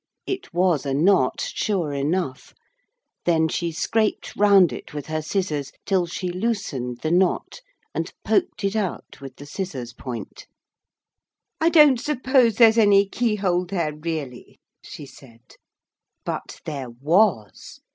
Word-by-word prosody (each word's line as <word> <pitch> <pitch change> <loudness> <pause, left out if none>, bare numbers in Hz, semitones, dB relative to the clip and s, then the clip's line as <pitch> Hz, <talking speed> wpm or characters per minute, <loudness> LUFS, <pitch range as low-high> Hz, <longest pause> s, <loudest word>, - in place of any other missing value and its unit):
It 385 -1 -5
was 175 -4 +2
a 135 -2 -2
knot, 155 -4 +2
sure 180 -9 -1
enough. 140 0 -2 0.7
Then 160 -2 +3
she 170 +1 -2
scraped 215 +6 -1
round 200 -4 +5
it - - -9
with 145 - -5
her 155 0 -3
scissors, 155 -5 -2
till 185 -3 +1
she 180 +2 -4
loosened 175 - -3
the 155 - 0
knot, 185 - +1 0.3
and - - -3
poked 350 - 0
it 200 +1 0
out 200 -9 -4
with 135 -2 -9
the 145 - -11
scissors 140 -8 -5
point. 125 -2 -8 1.1
'I 325 - +3
don't 300 -7 +6
suppose 260 -4 +2
there's 230 -1 +6
any 200 -2 +5
keyhole 195 -6 0
there 170 -5 -2
really,' 150 -5 -6 0.2
she 145 - -9
said. 120 -3 -17 0.7
But - - -5
there 140 -5 -5
was. 145 - 0
175 Hz, 135 wpm, -23 LUFS, 145-205 Hz, 1.1 s, don't